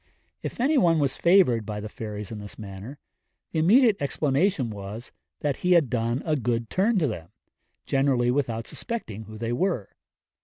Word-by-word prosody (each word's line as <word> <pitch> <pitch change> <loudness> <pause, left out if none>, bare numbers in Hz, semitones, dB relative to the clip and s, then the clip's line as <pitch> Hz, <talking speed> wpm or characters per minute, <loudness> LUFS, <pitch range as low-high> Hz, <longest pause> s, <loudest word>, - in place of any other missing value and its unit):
If - - -6
any 280 +4 +3
one 170 -5 +4
was 140 -3 +1
favoured 170 - +4
by 105 -1 -5
the 105 - -5
fairies 105 -1 -6
in 110 - -5
this 105 0 -9
manner, 105 +6 -8 0.5
the 160 - 0
immediate 215 +6 +5
explanation 140 - +1
was, 105 +3 -8 0.3
that 145 -2 0
he 180 0 +2
had 160 -8 +4
done 120 +1 0
a 155 -2 +1
good 120 -3 -1
turn 210 +4 +2
to 170 - +3
them, 85 -8 -5 0.6
generally 135 -3 +2
without 120 -4 -1
suspecting 110 - -5
who 110 +1 -10
they 115 +1 -2
were. 130 - 0
125 Hz, 170 wpm, -26 LUFS, 110-170 Hz, 0.6 s, immediate